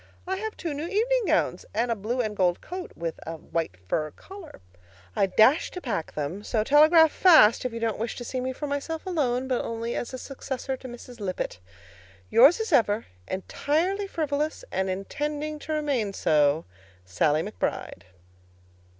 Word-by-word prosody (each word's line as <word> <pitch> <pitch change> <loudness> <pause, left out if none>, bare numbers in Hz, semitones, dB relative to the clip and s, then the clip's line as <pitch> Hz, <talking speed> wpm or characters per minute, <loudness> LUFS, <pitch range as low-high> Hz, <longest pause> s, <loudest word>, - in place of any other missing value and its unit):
I 380 +1 -2
have 440 +2 -5
two 330 -4 -3
new 295 +4 -4
evening 460 +5 +1
gowns - - +1
and 235 +2 +1
a - - +1
blue 230 +5 -2
and 215 -3 -3
gold 180 -3 +2
coat 365 0 -7
with 165 -1 -4
a 165 - -4
white 160 - -4
fur 155 - 0
collar. 385 - -12 0.6
I 195 - +3
dash 220 - +4
to 360 - -7
pack 215 - -4
them; 155 +7 -4
so 215 0 0
telegraph 310 +5 +6
fast 305 - +6
if 250 - -1
you 230 - -5
don't 225 -2 -1
wish 230 +1 -3
to 245 - -6
see 255 +1 -3
me 260 +1 -2
for 280 +3 -5
myself 290 +4 -3
alone, 265 -8 0
but 255 -2 0
only 230 +1 -3
as 240 - -3
a 260 - -5
successor 265 0 -5
to 260 - -10
Mrs. 245 0 -11
Lippett. 185 - -3 0.7
Yours 275 - +7
as 445 -6 -2
ever, 220 -4 +3 0.2
Entirely 330 - -1
frivolous, 305 - -2
And 190 0 -1
intending 295 +10 -3
to 310 - -4
remain 275 -9 0
so, 150 -2 +2 0.4
SALLIE 145 - +1
McBRIDE. 90 - -4
255 Hz, 175 wpm, -26 LUFS, 205-310 Hz, 0.7 s, Yours